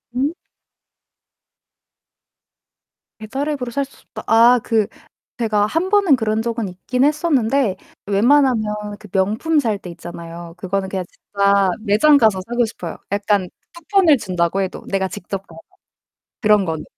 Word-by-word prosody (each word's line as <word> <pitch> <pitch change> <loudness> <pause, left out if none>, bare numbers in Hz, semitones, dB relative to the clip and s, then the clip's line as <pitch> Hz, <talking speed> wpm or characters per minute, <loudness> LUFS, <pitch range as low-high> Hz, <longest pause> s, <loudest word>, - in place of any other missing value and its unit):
음. 280 +6 0 2.9
'배달앱으로 265 +3 -3
살 280 +2 -1
수 275 - -21
없다.' - - -7
아 235 +2 +6
그 220 -3 +1 0.5
제가 210 -2 +1
1 330 - -1
번은 395 -8 +4
그런 220 -2 -1
적은 230 -2 -2
있긴 245 +8 -2
했었는데 280 - +1 0.3
웬만하면 210 -2 +2
그 210 - -13
명품 215 - +1
살 220 -6 0
때 180 - -10
있잖아요. 170 0 -9
그거는 190 +1 -2
그냥 190 -2 -3
진짜 200 -1 +1
매장가서 220 -2 +4
사고 240 0 +1
싶어요, 175 -6 -7
약간 200 -2 +1 0.3
쿠폰을 340 -3 +3
준다고 185 -2 -1
해도 190 - -4
내가 190 -1 0
직접 195 +2 -6
가서 165 -1 -13 0.8
그런 210 -3 +4
거는. 160 -2 -4
215 Hz, 265 characters per minute, -19 LUFS, 195-260 Hz, 2.9 s, 아